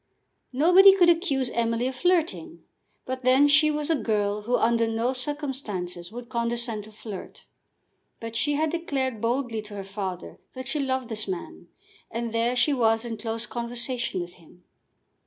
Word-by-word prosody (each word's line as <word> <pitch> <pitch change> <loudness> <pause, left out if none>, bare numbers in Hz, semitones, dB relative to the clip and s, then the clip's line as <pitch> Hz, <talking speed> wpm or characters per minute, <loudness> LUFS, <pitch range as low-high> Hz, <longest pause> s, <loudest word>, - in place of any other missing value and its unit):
Nobody 360 +8 +7
could 355 -3 +5
accuse 280 -7 0
Emily 230 +1 0
of 260 - -1
flirting; 260 - 0 0.4
but 260 0 -4
then 260 +3 +5
she 295 +2 +5
was 300 +1 -1
a - - +4
girl 210 -4 0
who 245 +4 +1
under 230 0 +2
no 225 +3 0
circumstances 250 - -5
would 240 +1 -8
condescend 235 -2 -2
to 215 - -14
flirt. 210 -2 -9 0.7
But 230 0 -7
she 290 +5 +1
had 310 +1 +1
declared 270 -9 -2
boldly 235 -1 -1
to 210 -1 -10
her 200 - -5
father 190 -2 -6
that 260 0 -7
she 300 +3 -1
loved 260 -3 -1
this 215 -2 -3
man, 185 -3 -6 0.4
and 230 -1 -4
there 230 +2 +1
she 270 +4 +3
was 225 -2 +2
in 230 -1 -4
close 225 +1 -4
conversation 240 -2 -2
with 175 0 -7
him! 175 +2 -20
235 Hz, 165 wpm, -26 LUFS, 220-270 Hz, 0.7 s, Nobody